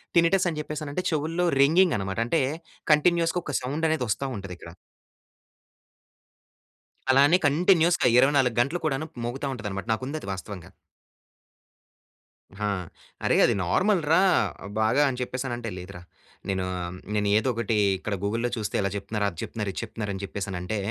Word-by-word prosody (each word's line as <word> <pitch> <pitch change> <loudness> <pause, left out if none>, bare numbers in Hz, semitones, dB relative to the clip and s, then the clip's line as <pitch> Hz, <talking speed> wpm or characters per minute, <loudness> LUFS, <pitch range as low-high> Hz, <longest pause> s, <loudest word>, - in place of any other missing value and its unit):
Tinnitus 175 +2 +4
అని 155 -2 -4
చెప్పేసి 150 0 -5
అంటే 180 - -2
చెవుల్లో 160 +3 0 0.2
రింగింగ్ 165 +5 +5
అన్నమాట. 95 -1 -4
అంటే 160 +5 +2 0.5
కంటిన్యూయస్‌గా 170 +2 +2
ఒక 145 - -3
సౌండ్ 145 +6 -1
అనేది 160 -5 0
వస్తా 135 +6 -1
ఉంటది 95 -2 -7
ఇక్కడ. 85 - -11 2.4
అలానే 140 +6 +6
కంటిన్యూయస్‌గా 170 +1 +4
24 135 -2 +4
గంటలు 145 +8 -1
కూడాను 155 +1 -1 0.2
మోగుతా 135 +4 -3
ఉంటది 115 -4 -5
అన్నమాట. 100 +2 -5
నాకు 110 - -4
ఉంది 155 +3 -4
అది - - -10
వాస్తవంగా. 95 -2 -8 1.9
హా! 105 0 -1 0.6
అరె - - +3
అది - - +3
నార్మల్‌ 185 - +2
రా 165 - +6 0.6
బాగా 110 +6 +3
అని 125 -1 -4
చెప్పేసి 125 +1 -3
అనిఅంటే. 120 -2 -4
లేదురా! 90 0 -9 0.5
నేను 95 -1 -1 0.5
నేను 105 -1 +1
ఏదో 110 - 0
ఒకటి 115 -1 -1 0.2
ఇక్కడ 100 +2 -4
గూగుల్‌లో 115 +4 0
చూస్తే 105 -2 -3
ఇలా 100 - 0
చెప్తున్నారు. 105 +1 -2
అది 85 - -14
చెప్తున్నారు. 105 -3 -4
ఇది - - -4
చెప్తున్నారు 110 -2 -5
అని 95 - -6
చెప్పేసి 100 +1 -4
అనిఅంటే. 90 +4 -3
125 Hz, 150 wpm, -26 LUFS, 105-155 Hz, 2.4 s, అలానే